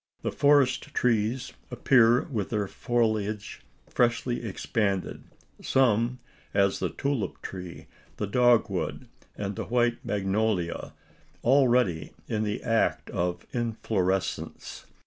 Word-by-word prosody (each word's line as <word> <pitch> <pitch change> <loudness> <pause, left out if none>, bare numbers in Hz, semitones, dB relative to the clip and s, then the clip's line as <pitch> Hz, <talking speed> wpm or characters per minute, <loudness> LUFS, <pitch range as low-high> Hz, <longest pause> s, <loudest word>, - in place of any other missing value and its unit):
The - - -1
forest 140 -3 +3
trees 120 +1 0 0.2
appear 120 -1 +4
with 110 - -3
their 105 -3 -1
foliage 110 -3 -1 0.3
freshly 120 0 0
expanded 100 -2 -2 0.4
some; 120 -1 +2 0.4
as 100 -1 +3
the - - -1
tulip 135 -9 -2
tree, 90 -3 -7 0.3
the 105 - -1
dogwood, 120 +2 +2 0.3
and 100 -1 -3
the - - -4
white 120 -1 +1
magnolia, 100 -3 -1 0.5
already 125 - +3
in 110 -1 -1
the 105 -1 -2
act 115 0 0
of 90 0 -2
inflorescence. 105 -5 -2
110 Hz, 105 wpm, -27 LUFS, 100-125 Hz, 0.5 s, appear